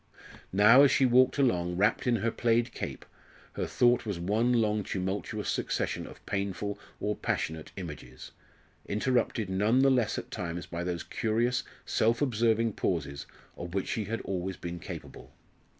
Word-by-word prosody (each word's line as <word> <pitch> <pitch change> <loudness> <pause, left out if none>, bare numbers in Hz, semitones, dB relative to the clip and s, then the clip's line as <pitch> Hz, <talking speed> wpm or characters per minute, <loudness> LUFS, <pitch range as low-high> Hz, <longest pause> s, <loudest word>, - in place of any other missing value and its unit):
Now, 105 +7 +7
as 140 - +7
she 135 - +3
walked 130 +1 +4
along, 90 -10 +1
wrapped 105 +5 +2
in 120 - +4
her 115 +1 0
plaid 120 +1 +1
cape, - - -6 0.5
her - - -2
thought 120 0 +3
was 100 -6 -4
one 110 +7 +1
long 110 -3 +2
tumultuous 100 +3 -3
succession - - -1
of - - -14
painful 100 +1 -3 0.2
or 105 0 -1
passionate 80 0 -3
images, 75 -8 -8 0.6
interrupted 115 0 0
none 105 +7 +2
the 135 - +5
less 125 -5 +1
at - - -6
times 85 0 -4
by 85 0 -5
those 90 -2 -3
curious 120 +3 0 0.2
self 115 +2 +2
observing 115 -4 +2
pauses 70 -8 -2 0.3
of 85 +1 -7
which 95 - -1
she 110 - -1
had 115 +3 -3
always 95 -1 -3
been 85 0 -6
capable. - - -9
105 Hz, 155 wpm, -29 LUFS, 90-120 Hz, 0.6 s, Now